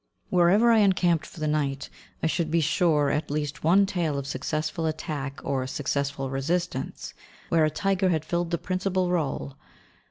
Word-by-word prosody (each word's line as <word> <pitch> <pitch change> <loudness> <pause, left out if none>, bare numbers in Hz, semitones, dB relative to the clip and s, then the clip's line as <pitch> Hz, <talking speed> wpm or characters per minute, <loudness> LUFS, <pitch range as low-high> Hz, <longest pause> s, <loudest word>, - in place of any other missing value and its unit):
Wherever 190 +6 +5
I 225 - +5
encamped 180 -5 +2
for - - -12
the 155 - -1
night, 140 -2 -1 0.4
I - - +2
should 160 0 0
be 165 +1 +2
sure 155 -2 +2
of - - +2
at 155 - -5
least 145 0 -3
one 190 +5 +5
tale 170 -7 -1
of 140 - -3
successful 155 +4 -2
attack 150 -3 -4
or 130 -2 -1
successful 140 0 -2
resistance, 140 +1 -2 0.4
where 160 -2 +4
a - - +2
tiger 190 +4 +1
had 160 -3 0
filled 170 +1 -1
the 170 - 0
principal 185 +1 -1
rôle. 155 -5 -1
155 Hz, 170 wpm, -26 LUFS, 145-180 Hz, 0.4 s, Wherever